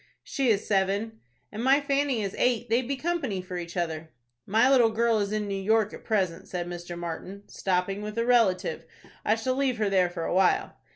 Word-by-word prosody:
"She 270 -4 -1
is 205 -2 +2
seven." 200 +3 0 0.3
"And 220 - -5
my 270 +2 +5
Fanny 280 -5 0
is 195 - -3
eight. 240 -2 +1
They'd 235 +1 +2
be 275 - -1
company 275 - -2
for 180 0 -6
each 170 0 -6
other." 160 -2 -3 0.4
"My 225 +5 +4
little 255 -4 +5
girl 225 0 +2
is 200 0 -1
in 215 -1 -1
New 200 - -3
York, 220 +1 +2
at - - -10
present," 190 -7 -1
said 175 -1 -4
Mr. 175 0 -7
Martin, 175 +4 -6
"stopping 190 +1 -1
with—with 210 +1 -6
a 230 - +1
relative. 225 -7 +2 0.4
I 215 - +3
shall 225 +3 -1
leave 265 -2 0
her 210 -2 0
there 185 -2 +3
for 175 -1 -5
a - - -1
while." 185 0 +2
210 Hz, 210 wpm, -27 LUFS, 185-240 Hz, 0.4 s, my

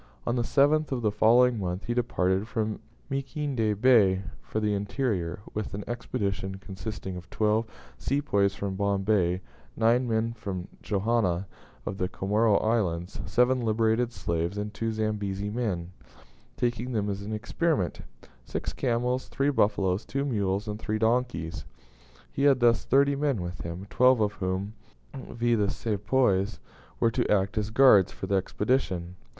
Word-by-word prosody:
On 120 - 0
the 120 - +1
7th 145 +5 +3
of 125 -3 -2
the 105 - +2
following 120 +3 +4
month 90 0 -3
he 120 - -1
departed 100 -5 0
from 110 -3 -2 0.3
Mikindany 135 -5 -1
Bay 105 -6 +5 0.2
for 110 - -3
the 105 -1 +1
interior, 100 -4 -2
with 105 -1 -4
an 100 - -5
expedition 100 -5 -3
consisting 95 0 -7
of 90 0 -9
twelve 110 +1 +1 0.3
Sepoys 100 -9 +1
from 100 -1 -3
Bombay, 95 -2 +1 0.4
nine 120 +3 +3
men 115 0 0
from 95 -6 -5
Johanna, 100 -3 0 0.4
of 100 0 -4
the 90 - 0
Comoro 105 +2 +2
Islands, 95 -7 -1
seven 125 +5 +3
liberated 115 +1 +1
slaves, 85 -2 -2
and 105 +1 -4
two 115 +2 -2
Zambezi 105 -2 -2
men, 100 -7 -2 0.7
taking 120 +1 -1
them 105 -2 0
as 100 -1 -3
an 100 +2 -6
experiment; 110 - -1 0.4
six - - -4
camels, 125 +1 0
three 140 +1 0
buffaloes, 100 -5 +1
two 140 +1 -2
mules, 100 -6 -1
and 105 0 -4
three 110 -1 -2
donkeys. 110 -7 0 0.7
He - - -4
had 140 -3 +5
thus 120 -1 +3
thirty 140 +2 +4
men 140 -5 0
with 90 0 -5
him, 85 +3 -6
twelve 125 0 +5
of 105 -1 +1
whom, 95 +2 -3 0.4
viz., 120 -3 -1
the 100 -1 +2
Sepoys, 105 -1 0 0.4
were 115 - +3
to - - 0
act 100 0 +2
as 105 0 -2
guards 110 -5 +6
for - - -6
the 100 - -2
Expedition. 95 -3 0
105 Hz, 150 wpm, -27 LUFS, 95-120 Hz, 0.7 s, guards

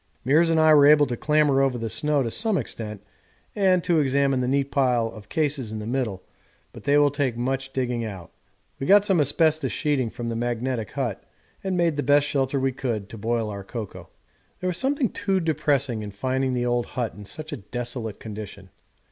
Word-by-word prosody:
Meares 155 +6 +4
and 165 -1 +3
I 155 0 +6
were 145 -1 +7
able 150 0 +6
to 125 - -3
clamber 150 0 +2
over 135 -2 +1
the 115 -1 -3
snow 145 +6 +1
to 115 - -3
some 220 - +1
extent 105 - -5 0.5
and 185 -3 +3
to 170 -2 +2
examine 140 -1 +2
the 125 - -1
neat 140 +1 0
pile 125 -4 +2
of 110 -2 -12
cases 145 -8 -1
in 110 - -4
the 105 - -6
middle, 115 -6 -2 0.5
but - - -12
they 145 +1 +4
will 145 -1 +4
take 135 -5 -1
much 135 +2 -2
digging 125 -3 -2
out. 95 -6 -7 0.5
We 135 - -3
got 205 +1 +6
some 190 -6 +3
asbestos 155 +2 +2
sheeting 140 -6 0
from 115 +1 -5
the 115 - -3
magnetic 120 0 -2
hut 125 -8 -3 0.4
and 190 -2 -1
made 170 -4 +1
the - - +1
best 145 0 +4
shelter 140 -1 0
we 135 0 +1
could 115 -6 -3
to 115 - -9
boil 115 0 -1
our 100 -1 -6
cocoa. 110 +1 -7 0.5
There 185 - -1
was 175 - -1
something 275 0 +1
too 195 -1 0
depressing 145 -7 0
in 105 - -6
finding 130 +5 -1
the 120 0 -1
old 120 -1 0
hut 120 -4 -1
in 105 - -11
such 155 +9 -8
a 145 - -4
desolate 120 0 -5
condition. 105 -3 -9
135 Hz, 205 wpm, -24 LUFS, 115-150 Hz, 0.5 s, were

